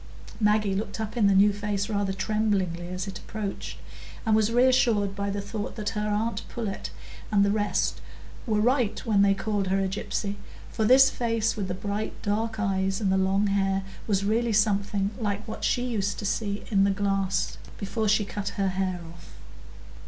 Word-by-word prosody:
Maggie 210 -2 +3
looked 200 +2 -3
up 220 +1 -4
in 220 -4 +4
the 200 - +4
new 205 +2 +6
face 205 0 -2
rather 200 -3 0
tremblingly 190 -3 0
as 185 +2 -4
it 190 -1 -6
approached, 210 -3 -5 0.5
and 220 -1 +4
was 220 0 +2
reassured 235 -5 +3
by 200 0 -2
the 200 0 -2
thought 205 +1 -5
that 210 -2 -2
her 210 -1 -2
aunt 215 +1 -1
Pullet 220 -5 -4 0.4
and 200 -1 +4
the 200 - +2
rest 205 -1 0 0.5
were 215 -2 +2
right 245 -1 +2
when 210 -4 +3
they 200 0 +4
called 205 -1 -1
her 190 +1 +1
a 195 - +1
gypsy; 200 +1 -3 0.3
for 220 - 0
this 265 +4 +7
face, 230 -2 0
with 200 -3 -3
the 180 - -3
bright 205 +2 -4
dark 220 +1 -1
eyes 195 -2 0
and 200 -3 +1
the - - +3
long 190 +2 +2
hair, 195 -1 +1 0.2
was 200 -2 +1
really 225 +2 +1
something 200 -1 +1
like 205 -1 -2
what 220 - -6
she 245 - +1
used 205 -6 -1
to 205 - -5
see 205 0 -1
in 195 -2 +4
the 200 - +4
glass 195 -1 0 0.2
before 215 +2 -2
she 210 0 +3
cut 200 0 -4
her 195 -1 +1
hair 185 -1 -2
off. 170 - -15
205 Hz, 190 wpm, -27 LUFS, 195-215 Hz, 0.5 s, this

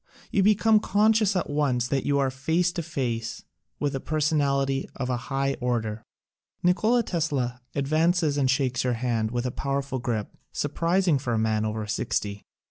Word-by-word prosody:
You 200 - +3
be 210 +2 +5
come 220 +1 +4
conscious 215 0 +3
at 180 - 0
once 135 -5 +1
that 135 -1 0
you 140 0 +2
are 135 -2 +1
face 160 +7 +1
to 175 -1 -3
face 120 -8 -3 0.4
with 145 -1 -1
a 135 - -2
personality 140 -3 0
of 125 -1 -2
a 125 - 0
high 135 0 0
order. 115 -3 -1 0.6
Nikola 215 +7 +3
Tesla 140 - -1
advances 155 +2 +2
and 135 -3 +1
shakes 130 -2 +1
your 125 -1 +1
hand 115 -2 -1
with 120 +1 -2
a 125 - -1
powerful 140 0 -2
grip, 115 -4 -3 0.2
surprising 165 +2 +1
for 125 -3 -2
a - - +1
man 110 -1 +1
over 110 0 -2
sixty. 105 0 -2
135 Hz, 170 wpm, -26 LUFS, 125-165 Hz, 0.6 s, be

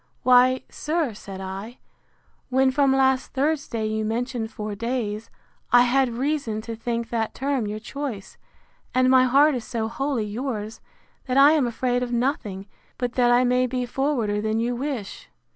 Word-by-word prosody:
—Why, 255 +1 +5
sir, 305 -5 -2
said 195 -2 -9
I, 195 +5 -7 0.7
when 265 +1 +3
from 275 0 +3
last 265 -1 +2
Thursday 275 -5 -1
you 215 0 -1
mentioned 230 +1 -2
four 210 -1 -5
days, 225 -1 -3 0.4
I 245 0 +7
had 260 +1 +2
reason 275 -5 -1
to 230 +1 -6
think 230 0 -3
that 225 -2 -2
term 270 -5 -1
your 210 +1 -4
choice; 235 -3 -6 0.6
and 255 0 +4
my 260 -1 +6
heart 280 +4 +5
is 245 -3 -3
so 225 -1 -3
wholly 255 -1 -2
yours, 220 -1 -4 0.5
that 255 +1 0
I 280 +2 +8
am 300 -5 +2
afraid 245 +1 -1
of 245 -1 -3
nothing, 235 -6 -1 0.3
but 245 -1 -2
that 245 -1 +3
I 245 +1 +5
may 250 0 +2
be 250 0 -2
forwarder 240 -5 -1
than 220 +1 0
you 240 +1 -1
wish. 250 -6 -5
245 Hz, 165 wpm, -24 LUFS, 220-265 Hz, 0.7 s, I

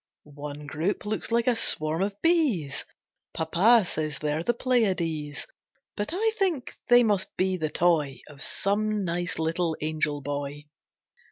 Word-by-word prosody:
One 145 0 -8
group 160 +9 -2
looks 215 +1 -1
like 235 0 +2
a 250 - +3
swarm 155 -5 +1
of 200 +1 -2
bees, 275 - +1 0.5
Papa 190 +8 +4
says 155 -4 -3
they're 150 +2 -1
the 205 - +2
Pleiades; 170 - 0 0.5
But 205 - -2
I 435 +6 +1
think 345 -10 0 0.2
they 245 0 +7
must 205 -4 0
be 185 0 +1
the 160 -4 -2
toy 155 -5 +1
Of 145 -2 -13
some 210 +3 0
nice 175 0 -2
little 160 0 0
angel 150 -1 -1
boy. 145 +1 -4
170 Hz, 145 wpm, -27 LUFS, 150-215 Hz, 0.5 s, they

